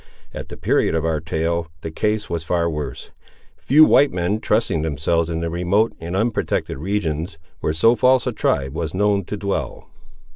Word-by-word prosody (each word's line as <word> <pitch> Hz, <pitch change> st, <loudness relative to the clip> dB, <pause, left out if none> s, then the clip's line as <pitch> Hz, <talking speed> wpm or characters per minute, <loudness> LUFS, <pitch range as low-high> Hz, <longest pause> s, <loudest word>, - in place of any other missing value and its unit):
At -, -, -7 dB
the -, -, -8 dB
period -, -, +1 dB
of 80 Hz, 0 st, 0 dB
our 80 Hz, -2 st, 0 dB
tale, 80 Hz, +2 st, -2 dB
the 80 Hz, -, -5 dB
case 105 Hz, +5 st, -1 dB
was 85 Hz, -2 st, -3 dB
far 85 Hz, +1 st, 0 dB
worse; 75 Hz, -4 st, -5 dB, 0.4 s
few 155 Hz, +3 st, +5 dB
white 145 Hz, -2 st, +5 dB
men 90 Hz, +4 st, -1 dB
trusting 105 Hz, -7 st, 0 dB
themselves 80 Hz, +2 st, 0 dB
in 85 Hz, 0 st, -2 dB
the 85 Hz, -, -2 dB
remote 90 Hz, +6 st, +1 dB
and 85 Hz, +2 st, -5 dB
unprotected 110 Hz, -, -1 dB
regions 85 Hz, -2 st, -2 dB, 0.2 s
where -, -, -1 dB
so 115 Hz, +10 st, +4 dB
false 130 Hz, +1 st, +3 dB
a 125 Hz, -, 0 dB
tribe 70 Hz, -, -1 dB
was 80 Hz, +1 st, -4 dB
known 100 Hz, -1 st, +1 dB
to 105 Hz, -, -5 dB
dwell. 95 Hz, -10 st, -4 dB
85 Hz, 180 wpm, -21 LUFS, 80-105 Hz, 0.4 s, few